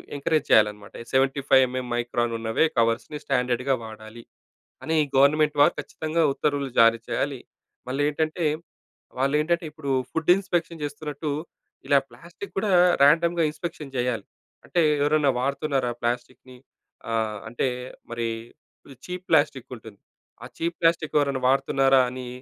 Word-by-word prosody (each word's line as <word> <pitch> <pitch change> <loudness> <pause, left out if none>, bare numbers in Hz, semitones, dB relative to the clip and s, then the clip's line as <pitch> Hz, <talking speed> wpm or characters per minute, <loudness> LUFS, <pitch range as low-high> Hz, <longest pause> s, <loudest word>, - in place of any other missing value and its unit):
Encourage 150 +1 0
చేయాలనమాట. 105 -1 +3 0.2
75 135 0 +3
MM 130 0 -4
micron 120 0 -1
ఉన్నవే 115 +6 +1
కవర్స్‌ని 115 +6 0
స్టాండర్డ్‌గా 125 0 0
వాడాలి. 110 +1 -11 0.6
అని 160 - -1 0.2
గవర్నమెంట్ 150 +2 +4
వారు - - +5
ఖచ్చితంగా 160 +1 -2
ఉత్తర్వులు 140 -1 -1
జారీ 115 0 +6
చేయాలి. 140 -2 -2 0.5
మళ్ళీ 135 +3 -1
ఏంటంటే 155 +3 -2 0.7
వాళ్ళు 135 +2 +1
ఏంటంటే 170 +2 0
ఇప్పుడు 150 -3 -5 0.2
ఫుడ్ 160 0 -3
ఇన్‌స్పెక్షన్ 175 -4 -2
చేస్తున్నట్టు 145 0 -4 0.6
ఇలా 140 - +5
ప్లాస్టిక్ 170 +11 -11
కూడా 200 +1 0 0.3
రాండమ్‌గా 170 +3 +4
ఇన్‌స్పెక్షన్ 155 -4 -7
చేయాలి. 120 -4 -1 0.4
అంటే 175 - +1 0.2
ఎవరన్న 145 0 +3
వాడుతున్నారా 135 -1 -1
ప్లాస్టిక్‌ని 125 +1 -4 0.6
ఆహ్, 110 -2 -1
అంటే 120 +3 -1 0.4
మరి 115 0 -2 0.8
చీప్ 180 0 -6
ప్లాస్టిక్ 130 -1 +2
ఉంటుంది. 110 -2 -14 0.4
ఆ - - -7
చీప్ 170 +1 -2
ప్లాస్టిక్ 165 -2 +1
ఎవరైనా 140 -2 0
వాడుతున్నారా 135 0 +3
అని 125 0 -7
140 Hz, 125 wpm, -25 LUFS, 120-155 Hz, 0.8 s, జారీ